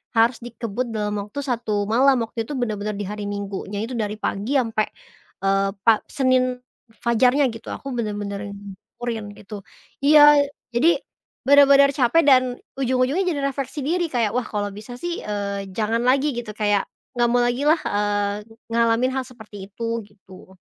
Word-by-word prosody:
harus 230 +1 +3
dikebut 235 0 -4
dalam 210 -1 -1
waktu 285 +7 -6
1 225 -6 -1
malam. 245 +3 +3
Waktu 225 0 -5
itu 295 - -5
bener-bener 215 -4 -2
di 205 - -4
hari 205 +1 -5
Minggunya 200 0 -4
itu 235 - -5
dari 210 0 -2
pagi 215 +5 -2
sampai, 225 -4 +1 0.6
eee, 195 0 +2
pa 225 -2 +5
Senin 255 -1 +1 0.5
fajarnya 250 +3 +3
gitu, 225 - -11
aku 275 - -7
bener-bener 205 -3 -3 0.2
yang - - -11 0.4
kurin 230 -3 -4
gitu. 205 0 -9 0.5
Iya, 295 0 +8 0.3
jadi 245 +8 +3 0.6
bener-bener 280 0 +7
capek 290 +5 +3
dan 260 -2 +6 0.4
ujung-ujungnya 260 +6 +1
jadi 300 -5 0
refleksi 275 +1 -3
diri 345 +2 0
kayak, 230 -6 0
wah 250 -1 -1
kalau 205 -1 -3
bisa 215 +5 -9
sih, 345 +6 -4
eee, 200 -1 -4
jangan 225 +1 0
lagi 275 +3 +3
gitu 215 -3 -6
kayak, 205 -2 +1 0.3
nggak 240 0 +2
mau 245 - +3
lagi 245 +3 0
lah, 315 +1 +4
eee, 205 0 0 0.4
ngalamin 235 +2 +2
hal 265 - -1
seperti 220 -5 -14 0.2
itu, 230 +1 -3
gitu. 195 -2 -17
230 Hz, 160 wpm, -22 LUFS, 210-260 Hz, 0.6 s, Iya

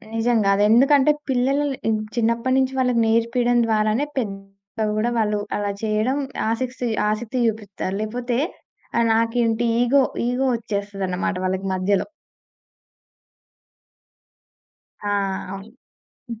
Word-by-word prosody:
నిజంగా! 225 -3 +2
అది 205 - +2
ఎందుకంటే 270 +5 +5 0.2
పిల్లలని 270 0 0 0.2
చిన్నప్పటినుంచి 255 +3 +1
వాళ్ళకి 250 -2 +2
నేర్పియడం 235 +2 +2
ద్వారానే 215 +4 +1
పెద్ద 195 -1 -5
కూడా 235 +3 +1
వాళ్ళు 210 -2 +1 0.2
అలా 205 -1 -1
చేయడం 220 +5 +1 0.3
ఆసక్తి, 250 +1 -2 0.2
ఆసక్తి 225 +4 -2
చూపిత్తారు. 205 -3 -3
లేపోతే 240 +2 -2 0.6
ఆ - - +4
నాకేంటి! 230 0 +1 0.2
ఈగో, 265 +3 +4 0.2
ఈగో 250 +2 0
వచ్చేస్తదన్నమాట 200 -4 -3
వాళ్ళకి 190 +1 -2
మధ్యలో. 185 +1 0 3.0
ఆ! - - -3 0.5
అవును. 195 +3 -9 0.6
హ్మ్. 230 -2 -6
225 Hz, 100 wpm, -22 LUFS, 205-245 Hz, 3.0 s, ఎందుకంటే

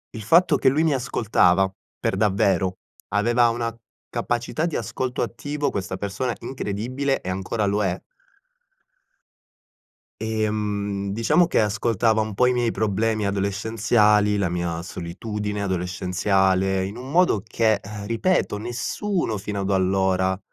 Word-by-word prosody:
Il 110 - -5
fatto 165 - +4
che 130 - +4
lui 155 +4 +2
mi 155 -3 +3
ascoltava, 100 -7 +2 0.3
per - - -1
davvero, 95 -2 +2 0.4
aveva 120 +3 +3
una 115 -1 -2 0.4
capacità 120 +7 -1
di 165 - -4
ascolto 125 -2 -2
attivo, 145 +5 -3
questa 95 -1 -3
persona, 100 +5 -2
incredibile 130 +4 -2
e 95 - -5
ancora 100 +3 -2
lo 100 +1 +1
è. 95 -1 -1 2.2
Ehm, 105 -2 -2
diciamo, 150 - +3
che - - +1
ascoltava 110 +1 +2
un 110 -1 -3
po' 125 +5 +3
i 125 - +3
miei 120 -2 +1
problemi 110 0 0
adolescenziali, 105 +1 +2
la 100 -3 +1
mia 85 -1 -2
solitudine 105 +4 -4
adolescenziale, 95 +1 +1
in 100 +4 -6
un 130 +2 -8
modo 170 - +3
che, 110 -2 +2 0.3
ripeto, 115 - +1
nessuno 120 - -2
fino 100 0 -4
ad 100 +1 -1
allora, 95 0 +1
105 Hz, 130 wpm, -23 LUFS, 95-120 Hz, 2.2 s, fatto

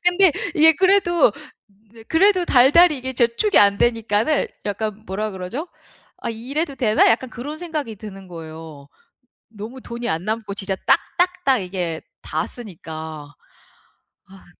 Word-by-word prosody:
근데 355 -1 +5 0.2
이게 320 +1 +7
그래도 370 -2 +4
으 220 +2 -16
그래도 370 +2 +4
달달이 290 +4 +5
이게 260 +1 -5
저축이 245 - +2
안 200 0 +5
되니까는 230 +4 +1 0.2
약간 215 +1 -4
뭐라 210 +3 -3
그러죠? 200 - -6 0.5
'아 - - -4
이래도 275 +7 -3
되나?' 220 -4 +3
약간 245 +3 +1
그런 290 +5 -7
생각이 305 -10 -5
드는 195 -2 -10
거예요. 160 -3 -10 0.6
너무 225 +4 -9
돈이 235 0 -5
안 160 +2 -2
남고 215 -2 -3
진짜 195 -1 -3
딱 - - +5 0.2
딱 360 +1 +3
딱 265 -2 +4
이게 180 -3 -4 0.2
다 - - -3
쓰니까. 160 -8 -9 1.0
아. 195 -1 -16
225 Hz, 280 characters per minute, -21 LUFS, 195-295 Hz, 1.0 s, 이게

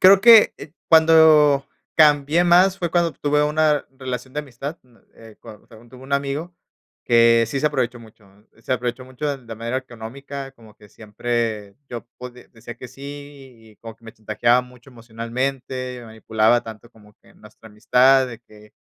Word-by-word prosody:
Creo 190 +1 +7
que, 230 -2 +7
eh, 145 +1 -12 0.2
cuando 160 -3 +5 0.3
cambié 150 +2 +4
más 180 +2 +4
fue 175 -2 -3
cuando 170 -2 +1
tuve 150 0 0
una 150 0 +1
relación 130 0 -6
de 150 - -2
amistad, 140 +4 -8
uh, 120 -2 -26 0.2
eh, 110 -1 -16
cuand 105 -1 -14 0.2
tuve 130 - -14
un 135 +1 -10
amigo, 140 +5 -3 0.5
que 115 -1 +4
sí 135 +4 -4
se 150 - +1
aprovechó 125 -5 -2
mucho, 110 -2 -18 0.3
¿eh? 115 - -25
Se 130 - -3
aprovechó 125 +1 -3
mucho, 130 +3 -7
de 135 -3 -5
de 115 -1 -8
manera 115 +3 -4
económica, 135 +3 -8
como 110 -4 -19
que 105 - -19
siempre 110 -1 -4
yo 120 -1 -8
podi 125 0 -11
decía 115 0 -11
que 125 +1 -11
sí 135 +3 -16
y 140 -5 -12
y - - -27
como 115 -1 -11
que 115 - -26
me 115 - -11
chantajeaba 120 +3 +1
mucho 125 +1 -18
emocionalmente, 125 +2 -5
me 120 - -12
manipulaba 110 +1 0
tanto 110 0 -12
como 105 -1 -21
que - - -23
nuestra 105 +1 -17
amistad, 130 +5 +3
de 115 -1 -10
que: 105 -2 -20
125 Hz, 180 wpm, -21 LUFS, 115-145 Hz, 0.5 s, Creo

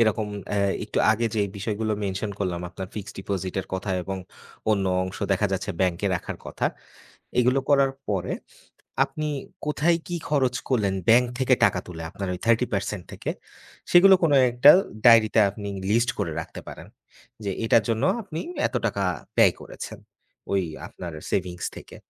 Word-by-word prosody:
এরকম 110 -1 +2 0.2
অ্যা 105 - 0 0.3
একটু - - -3
আগে 115 +2 +1
যেই 100 -2 +1
বিষয়গুলো 110 +2 -2
mention 100 +2 -2
করলাম, 90 -3 -2
আপনার 95 +2 -7
fixed 105 0 -7
deposit-এর 95 -1 -3
কথা 95 +1 -3
এবং 95 +2 -4 0.5
অন্য 100 -2 +2 0.2
অংশ 95 - -6
দেখা 105 +2 +2
যাচ্ছে 95 +2 -2
ব্যাঙ্কে 90 +2 +1
রাখার 85 - -4
কথা। - - -1 0.7
এগুলো 125 +3 +3
করার 140 -1 +4 0.2
পরে, 95 -4 -1 0.7
আপনি 150 +3 -4 0.4
কোথায় 165 +3 +2
কি 175 - -2
খরচ 130 -4 +2
করলেন? 105 -7 +1
bank 120 +2 +6
থেকে 130 -1 +4
টাকা 90 - +2
তুলে 80 -2 -7
আপনার 100 0 -5
ওই - - -6
30% 105 -5 +1
থেকে, - - -4 0.6
সেগুলো 190 +2 +8
কোনো 150 -4 +4 0.2
একটা 125 +4 +7 0.3
diary-তে 115 -2 +7
আপনি 100 0 -7 0.2
list 120 +2 +3
করে 80 - -1
রাখতে - - -8
পারেন, - - -9 0.6
যে 100 - -1
এটার 115 0 +4
জন্য 115 +3 +1 0.2
আপনি 165 -5 -6 0.3
এত - - -18
টাকা 100 -2 -1 0.3
ব্যয় - - +6
করেছেন, - - -8 0.5
ওই 95 -1 +2 0.2
আপনার 85 -2 -8 0.2
savings 90 -2 -2
থেকে। - - -12
105 Hz, 155 wpm, -25 LUFS, 95-125 Hz, 0.7 s, সেগুলো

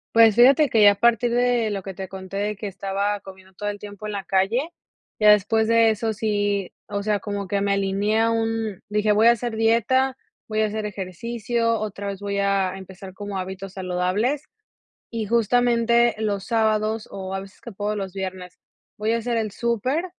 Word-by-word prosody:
Pues, 225 -2 +7
fíjate 275 +4 +6
que 220 - +3
ya 205 -1 +9
a - - -2
partir 235 +2 +3
de 245 -2 +2
lo 195 -2 -4
que 195 - -6
te 190 0 -6
conté 190 0 -8
de 210 +1 -1
que 205 +1 -6
estaba 200 +1 -2
comiendo 190 -1 -14
todo 205 +3 -5
el 205 0 -3
tiempo 205 0 -9
en 210 - -4
la 200 -1 -4
calle, 220 - +1 0.5
ya 210 0 +7
después 220 +2 +3
de 230 -1 +5
eso 220 +1 -1
si, 205 -3 -1 0.2
o 200 -1 -3
sea, 210 -1 +1
como 200 -1 -5
que 200 - 0
me 200 0 +1
alineé 200 +2 0
a 230 - +3
un 225 -3 -2
dije: 210 0 +1
"Voy 215 +2 +5
a - - +9
hacer 235 -1 -2
dieta, 235 +4 +2 0.3
voy 215 0 0
a 215 - +2
hacer 215 0 -4
ejercicio, 230 +4 -2
otra 205 -1 -5
vez 200 0 -5
voy 200 0 -3
a 195 -1 +1
empezar 190 0 -11
como 205 0 -6
hábitos 190 +1 -6
saludables", 190 +9 -1 0.7
y 225 -2 -3
justamente, 235 +1 +3
los 200 -3 -2
sábados 220 -1 0
o, 190 -1 -6
a 195 - -2
veces 195 0 -13
que 235 - -9
puedo 210 +2 -3
los 195 -2 -4
viernes, 185 -2 -6 0.4
voy 220 +2 0
a - - +2
hacer 235 0 -1
el 215 -2 -2
súper 240 - -1
210 Hz, 200 wpm, -23 LUFS, 195-230 Hz, 0.7 s, ya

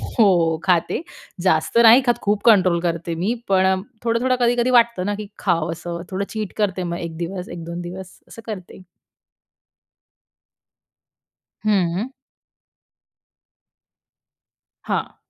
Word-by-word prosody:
हो. 175 -8 +2
खाते, 180 +4 +1 0.4
जास्त 185 +4 +2
नाही 235 +3 +8
खात 240 - +2
खूप 205 0 0
कंट्रोल 185 -6 +5
करते 170 -1 -2
मी, 190 +8 -1
पण 190 0 +2 0.2
थोडं-थोडं 235 +2 +1
कधी-कधी 240 +1 +2
वाटतं 235 -6 +3
ना 205 - -1
की 210 - -6
खाव 170 -3 0
असं, 170 +1 -6
थोडं 195 +1 -2
चीट 215 -3 -4
करते 195 -4 0
मग, 170 -1 -3
1 165 -1 -6
दिवस, 180 +2 -5
1-2 170 0 -7
दिवस 180 +1 -9
असं 230 - -12
करते. 190 -4 -8 2.8
हं. 195 +3 +1 2.8
हां. - - -2
190 Hz, 115 wpm, -21 LUFS, 170-220 Hz, 2.8 s, नाही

